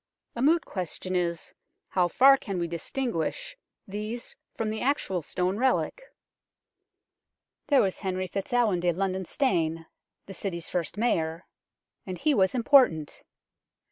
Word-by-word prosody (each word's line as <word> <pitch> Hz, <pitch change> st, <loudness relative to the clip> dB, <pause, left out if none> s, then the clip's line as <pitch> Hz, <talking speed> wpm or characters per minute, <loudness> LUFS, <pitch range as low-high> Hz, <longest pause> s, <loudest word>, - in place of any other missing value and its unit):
A 235 Hz, -, -3 dB
moot 320 Hz, +4 st, +3 dB
question 185 Hz, 0 st, -4 dB
is, 170 Hz, -2 st, -2 dB, 0.4 s
how 180 Hz, -2 st, +2 dB
far 270 Hz, +10 st, +6 dB
can 200 Hz, -7 st, -5 dB
we 170 Hz, -1 st, -1 dB
distinguish 235 Hz, -, -3 dB, 0.3 s
these 215 Hz, +4 st, -5 dB, 0.2 s
from 220 Hz, -1 st, -1 dB
the 220 Hz, -, -4 dB
actual 245 Hz, -, 0 dB
stone 180 Hz, +5 st, -1 dB
relic? 260 Hz, -, +1 dB, 1.7 s
There 280 Hz, -3 st, +5 dB
was 190 Hz, -2 st, -1 dB
Henry 185 Hz, -1 st, -2 dB
FitzAlwin 200 Hz, +1 st, 0 dB
de 175 Hz, 0 st, +1 dB
Londone 190 Hz, 0 st, -2 dB
Stane, 165 Hz, -, 0 dB, 0.4 s
the 195 Hz, -, -9 dB
City's 175 Hz, -3 st, -4 dB
first 175 Hz, 0 st, -2 dB
Mayor 165 Hz, -7 st, 0 dB, 0.6 s
and 185 Hz, -6 st, -6 dB
he 300 Hz, -, +2 dB
was 190 Hz, -2 st, +2 dB
im 240 Hz, -, 0 dB
portant. 225 Hz, -, +4 dB
190 Hz, 135 wpm, -27 LUFS, 175-245 Hz, 1.7 s, far